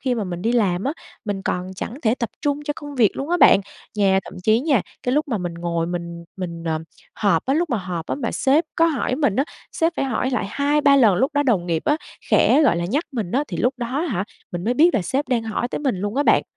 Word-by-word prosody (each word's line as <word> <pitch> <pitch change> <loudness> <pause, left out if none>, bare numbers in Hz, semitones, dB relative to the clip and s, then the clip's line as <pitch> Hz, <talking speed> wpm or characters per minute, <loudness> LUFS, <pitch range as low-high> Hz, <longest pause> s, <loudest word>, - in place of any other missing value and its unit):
khi 255 -2 0
mà 220 - -2
mình 175 -2 -5
đi 230 - +1
làm 200 -6 +1
á, 275 - 0 0.3
mình 200 -3 -3
còn 180 0 -2
chẳng 220 - -5
thể 225 0 +3
tập 235 -3 -3
trung 290 -1 0
cho 295 - -1
công 290 -1 -8
việc 230 -6 +3
luôn 275 +3 -4
á 350 - +3
bạn. 200 - +7 0.4
Nha 195 -2 +3
thậm - - -10
chí 220 +1 +4
nha, 275 - +2 0.2
cái 250 - 0
lúc 300 0 +1
mà 225 - -1
mình 175 -2 -4
ngồi 170 -1 -2
mình 170 -1 -5
mình, 170 -3 -5
ờ, 160 -1 0 0.4
họp 195 -6 +1
á, 270 - +2
lúc 335 +2 0
mà 240 - +1
họp 180 -4 -4
á - - -1
mà 240 -5 -3
sếp 285 +5 +3
có 330 - +4
hỏi 285 -5 0
mình 275 -9 +1
á, 270 - +3 0.3
sếp 330 +1 +1
phải - - 0
hỏi 255 0 -1
lại 250 -6 -1
2-3 285 0 +3
lần 225 -8 +5
lúc 265 - +1
đó 290 - +3
đồng 215 -11 +1
nghiệp 165 -2 -1
á, 295 - +3 0.3
khẽ, 305 - +5
gọi 280 - +4
là, 170 - -1
nhắc 275 - 0
mình 215 -8 -3
á, 280 +4 +1
thì - - -4
lúc 250 +3 +1
đó 240 -2 -3
á 320 +4 0
hả, 195 - -1 0.3
mình 175 0 -4
mới 240 +3 +1
biết 330 +7 +5
là 215 - +2
sếp 270 - -2
đang 245 -3 +1
hỏi 225 +2 -2
tới - - -3
mình 270 -8 0
luôn 205 +4 -3
á 285 - +3
bạn. - - +4
235 Hz, 275 wpm, -22 LUFS, 185-280 Hz, 0.4 s, bạn